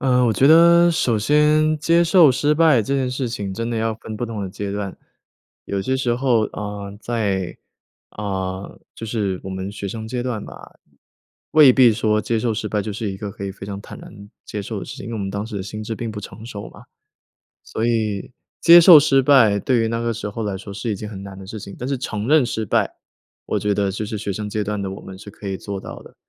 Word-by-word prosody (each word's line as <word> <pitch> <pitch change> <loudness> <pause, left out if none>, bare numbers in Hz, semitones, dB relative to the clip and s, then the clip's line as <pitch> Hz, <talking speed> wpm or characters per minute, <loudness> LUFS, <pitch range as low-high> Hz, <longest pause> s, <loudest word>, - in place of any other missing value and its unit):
呃， 125 -1 +3
我 110 - +2
觉 135 - +3
得 170 +1 +7
首 125 -9 +1
先 150 +5 +3
接 170 +3 +3
受 170 -4 +6
失 145 +4 +1
败 150 -7 +4
这 135 +7 -2
件 130 -2 -1
事 130 -1 -2
情， 100 -5 -4
真 115 +3 -3
的 115 - -2
要 110 0 -1
分 110 0 -8
不 120 +3 -3
同 110 -3 -5
的 95 - -5
阶 100 +1 -5
段。 100 -2 -4 0.7
有 100 -1 -3
些 130 +6 -1
时 125 -3 0
候， 120 -2 +2
呃， 105 -1 -6
在 100 -7 -2 0.6
呃， 95 -2 -4
就 115 - -7
是 105 -5 -2
我 95 - -5
们 95 +1 -5
学 100 -1 -6
生 110 +2 -6
阶 125 +1 -3
段 120 -5 -3
嘛， - - -10 1.0
未 150 -5 +8
必 125 -3 +6
说 105 -1 +1
接 115 +1 -1
受 115 0 0
失 110 0 -3
败， 105 0 -1
就 105 - -5
是 105 -1 -4
一 - - -7
个 105 0 -6
可 100 - -8
以 95 - -4
非 95 - -10
常 100 -1 -6
坦 - - -11
然 100 -1 -13 0.2
接 105 - -5
受 105 0 -5
的 - - -6
事 - - -9
情， - - -8
因 115 - -6
为 - - -3
我 - - -4
们 95 -1 -3
当 100 +2 -4
时 110 -2 -6
的 95 - -3
心 105 +3 -7
智 110 +1 -4
并 115 +1 -5
不 105 -1 -6
成 110 +2 -10
熟 105 -3 -8
嘛。 - - -15 0.8
所 110 +2 -3
以 110 -2 -1 0.3
接 170 0 +9
受 170 -1 +10
失 135 -2 +3
败， 120 -7 +5
对 125 +1 +1
于 115 - +1
那 115 +1 -2
个 115 0 -1
时 110 -1 -5
候 115 +3 -5
来 100 -2 -2
说 100 +1 -9
是 115 +3 -4
一 105 - -1
件 105 +2 -7
很 100 -2 -8
难 95 -1 -9
的 95 - -10
事 105 +2 -7
情。 100 - -9
但 125 - -4
是 140 - 0
承 110 -4 -4
认 150 -2 +5
失 110 -2 -3
败， - - 0 0.5
我 - - -1
觉 105 0 0
得 100 0 0
就 105 +2 -4
是 105 -1 -4
学 100 -1 -3
生 105 +2 -5
阶 105 0 -2
段 105 0 -3
的 95 - -3
我 95 - -8
们， 95 - -10
是 100 - -11
可 100 - -11
以 95 - -2
做 100 0 -6
到 - - -9
的， - - -16
110 Hz, 275 characters per minute, -21 LUFS, 100-125 Hz, 1.0 s, 受